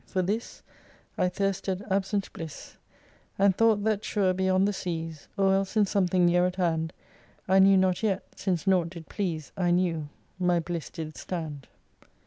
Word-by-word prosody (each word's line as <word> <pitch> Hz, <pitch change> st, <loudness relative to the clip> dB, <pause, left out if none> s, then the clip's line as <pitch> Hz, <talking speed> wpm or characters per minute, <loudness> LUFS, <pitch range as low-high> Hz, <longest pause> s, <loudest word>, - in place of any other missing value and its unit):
For 185 Hz, -1 st, 0 dB
this 210 Hz, +6 st, -3 dB, 0.5 s
I 180 Hz, -, +1 dB
thirsted 195 Hz, 0 st, -2 dB
absent 195 Hz, +1 st, 0 dB
bliss, 160 Hz, -2 st, -8 dB, 0.6 s
And 195 Hz, -1 st, +4 dB
thought 220 Hz, -2 st, +3 dB
that 215 Hz, -1 st, 0 dB
sure 195 Hz, -4 st, +1 dB
beyond 190 Hz, +1 st, +2 dB
the 205 Hz, -, 0 dB
seas, 165 Hz, -5 st, -5 dB
Or 195 Hz, -1 st, +4 dB
else 195 Hz, +2 st, 0 dB
in 210 Hz, -, +5 dB
something 185 Hz, -2 st, +2 dB
near 175 Hz, +1 st, +4 dB
at 180 Hz, -, -4 dB
hand 165 Hz, -3 st, 0 dB, 0.6 s
I 190 Hz, +1 st, +5 dB
knew 195 Hz, 0 st, +7 dB
not 185 Hz, -1 st, +2 dB
yet, 200 Hz, -3 st, 0 dB
(since 185 Hz, -2 st, -1 dB
nought 185 Hz, -3 st, +3 dB
did 170 Hz, -2 st, -11 dB
please 165 Hz, -8 st, -3 dB
I 180 Hz, -2 st, +1 dB
knew,) 170 Hz, -4 st, +1 dB, 0.3 s
my 180 Hz, -1 st, +2 dB
bliss 170 Hz, -2 st, -4 dB
did 155 Hz, -1 st, -7 dB
stand. 155 Hz, -6 st, -5 dB
185 Hz, 165 wpm, -27 LUFS, 170-195 Hz, 0.6 s, knew